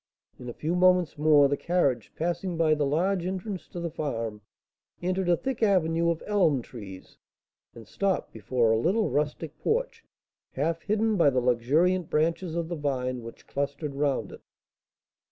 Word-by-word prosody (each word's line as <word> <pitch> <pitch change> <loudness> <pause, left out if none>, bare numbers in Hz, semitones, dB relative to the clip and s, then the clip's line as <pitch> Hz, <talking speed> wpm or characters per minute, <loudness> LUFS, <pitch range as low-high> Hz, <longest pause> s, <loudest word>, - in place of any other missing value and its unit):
In 125 - -7
a - - -5
few 160 +7 -2
moments 180 -4 +3
more, 150 -2 +6
the 140 - 0
carriage, 140 -8 0
passing 175 +1 -2
by 160 -2 +3
the 150 -2 +1
large 175 +5 +1
entrance 190 0 -5
to 175 - -7
the 170 -1 -3
farm, 115 -9 -4 0.6
entered 185 +1 -1
a 175 - +4
thick 265 +2 -4
avenue 170 -5 +2
of 165 -1 -2
elm 165 - +2
trees, 100 -7 -11 0.6
and 115 -3 -12
stopped 195 - -1
before 115 +1 +1
a 110 - +3
little 200 - +1
rustic 150 +1 -2
porch, 470 0 -1 0.5
half 165 +4 -1
hidden 215 +1 +1
by 165 -5 +5
the 130 -2 +1
luxuriant 145 +9 +2
branches 165 +2 0
of 170 -1 -2
the 170 - -3
vine 130 -4 -2
which 115 0 -11
clustered 140 +1 -3
round 140 -1 -1
it. - - -11
160 Hz, 165 wpm, -27 LUFS, 135-180 Hz, 0.6 s, more